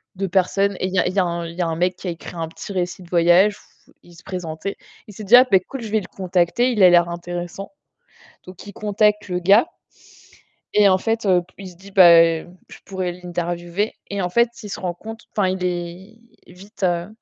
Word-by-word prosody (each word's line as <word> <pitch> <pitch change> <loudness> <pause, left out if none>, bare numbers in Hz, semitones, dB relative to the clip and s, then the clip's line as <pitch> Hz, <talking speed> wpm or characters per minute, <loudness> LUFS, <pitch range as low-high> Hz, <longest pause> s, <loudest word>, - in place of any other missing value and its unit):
de 195 +1 -3
personnes 195 +2 +1
et - - -1
il 190 - -7
y 185 - +2
a - - +1
il 180 - -3
y 200 - +1
a 170 -1 -1
il 165 - -10
y 180 - -3
a - - +1
un 165 - -2
mec 180 +2 0
qui 185 - -8
a - - -1
écrit 170 +1 -10
un 165 -1 -4
petit 165 - -10
récit 180 0 -3
de 170 - -17
voyage 175 +4 +4 0.3
où - - -23
il 175 - -18
se 170 - -15
présentait. 180 0 -6 0.3
Il 210 - -12
s'est 215 - -8
dit: 215 +5 +6
«Ah 255 +1 +8
beh 190 -2 +5
cool, 265 +6 -8
je 215 -2 -7
vais 220 -1 +1
le - - -10
contacter, 185 +6 +1
il 210 -5 +2
a 180 - +9
l'air 175 0 +4
intéressant» 175 +4 -6 0.8
donc 185 +2 -12
il 205 - -9
contacte 210 0 0
le 180 0 -2
gars 200 - +4 1.1
et 205 -1 +5
en 185 0 +3
fait, 225 +1 -2
heu, 180 -2 +3
p 180 - -26
il 190 -2 -9
se 175 - -17
dit: 195 +2 -15
«Bah, 170 -3 +8 0.2
je 180 +1 -16
pourrais 185 -2 -4
l'interviewer», 175 +2 -4 0.2
et 200 -1 -2
en 180 - -1
fait, 235 +4 +3
il 210 - -8
se - - -6
rend 180 -2 -3
compte 225 +4 -10
enfin, 195 -3 +2
il 185 0 -3
est 180 +5 -5 0.3
vite, 195 +3 -16
heu 175 +1 0
185 Hz, 240 wpm, -21 LUFS, 175-200 Hz, 1.1 s, a